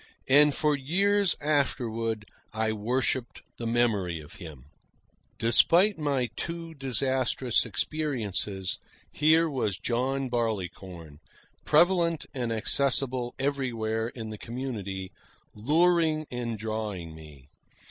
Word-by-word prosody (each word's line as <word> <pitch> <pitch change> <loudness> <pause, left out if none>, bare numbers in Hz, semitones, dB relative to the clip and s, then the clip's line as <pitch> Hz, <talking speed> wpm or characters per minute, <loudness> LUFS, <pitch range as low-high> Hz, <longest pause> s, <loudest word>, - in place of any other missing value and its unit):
And 145 +2 +6
for 150 -1 +2
years 195 +7 +2
afterward 115 -7 0 0.3
I 110 0 0
worshipped 120 +3 -1
the 115 - -4
memory 105 -8 +1
of 75 -1 -12
him. 75 -8 -10 0.7
Despite 170 - +4
my 135 -6 0
two 170 -1 -5
disastrous 130 -2 0
experiences, 105 - -2 0.3
here 160 +2 +4
was 120 - -1
John 130 +5 -1
Barleycorn, 95 - -4 0.5
prevalent 170 0 +3
and 120 -3 -2
accessible 125 +1 +1
everywhere 120 -5 -1
in 115 -2 -7
the 110 -1 -7
community, 105 -7 -5 0.4
luring 155 +5 +2
and 120 -2 -3
drawing 105 -6 -4
me. 75 -4 -14
120 Hz, 100 wpm, -28 LUFS, 110-145 Hz, 0.7 s, And